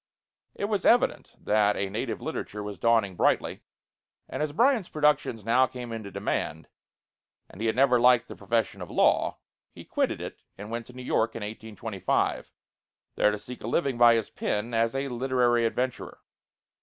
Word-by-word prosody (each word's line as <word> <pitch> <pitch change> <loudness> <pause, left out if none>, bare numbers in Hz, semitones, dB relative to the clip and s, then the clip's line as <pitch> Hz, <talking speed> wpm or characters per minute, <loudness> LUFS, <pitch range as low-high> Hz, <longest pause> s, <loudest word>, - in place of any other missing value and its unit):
It - - -2
was 205 -2 -1
evident 240 - +2
that 105 -1 +2
a 100 - -1
native 110 +3 -4
literature 105 0 -5
was 105 -3 -7
dawning 115 -5 +2
brightly; - - +1 0.7
and 130 - -5
as 150 -1 -1
Bryant's 235 - +2
productions 150 -8 +1
now 125 +3 +4
came 125 -2 -8
into 110 -3 -6
demand, 80 -4 -3 0.8
and 100 - -12
he 115 - 0
had 110 - +1
never 125 -1 +4
liked 125 0 +5
the - - -9
profession 115 -2 -1
of - - -7
law, - - +2 0.3
he - - -13
quitted - - -1
it - - -7 0.2
and 105 +3 -8
went 115 0 -4
to 125 - -13
New 125 0 -9
York 115 -2 0
in 115 - -5
1825, 110 -1 -2 0.6
there - - +3
to 105 - -2
seek 125 +4 -10
a - - -4
living 135 -1 0
by 120 -1 +7
his 115 -2 -2
pen 105 +3 -2
as 115 +2 +1
"a 135 +1 -1
literary 120 -2 +2
adventurer." 125 +2 -3
115 Hz, 175 wpm, -27 LUFS, 110-130 Hz, 0.8 s, by